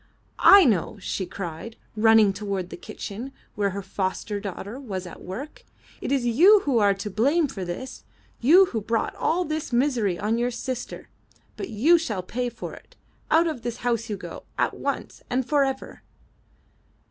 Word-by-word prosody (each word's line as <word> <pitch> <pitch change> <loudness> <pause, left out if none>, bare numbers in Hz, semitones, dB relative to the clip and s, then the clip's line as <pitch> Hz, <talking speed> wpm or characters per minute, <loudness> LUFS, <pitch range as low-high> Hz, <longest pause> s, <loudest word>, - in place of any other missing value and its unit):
''I 395 -3 +9
know/* 205 -1 0
she 190 -1 -3
cried, 180 +5 -6 0.2
running 220 -2 +5
toward 195 -2 -4
the - - -5
kitchen 230 +7 -7 0.2
where 205 -1 0
her 200 +1 -5
foster 190 +2 -3
daughter 200 +4 -6
was 195 -9 -5
at 175 - -10
work. 250 +12 -8 0.4
It - - -3
is 270 -3 +1
you 360 - +6
who 270 -8 +1
are 200 -2 +4
to 200 +2 -5
blame 280 - +2
for 205 -8 -6
this 180 +10 -6 0.2
— - - -34
you 375 +4 +9
who 225 - -1
brought 225 +2 -1
all 355 +2 0
this 310 -2 -3
misery 240 -7 +1
on 220 +5 0
your 240 +1 +1
sister. 250 0 -5 0.5
But 385 - -6
you 310 +11 +4
shall 215 - -3
pay 245 +6 -2
for 235 - -8
it. - - -15 0.3
Out 325 +2 +5
of 310 -7 -3
this 240 0 -4
house 230 -1 0
you 205 - -2
go. - - -9
At - - +1
once - - -4
and 255 0 0
forever.'' 270 -3 0
230 Hz, 175 wpm, -25 LUFS, 200-270 Hz, 0.5 s, I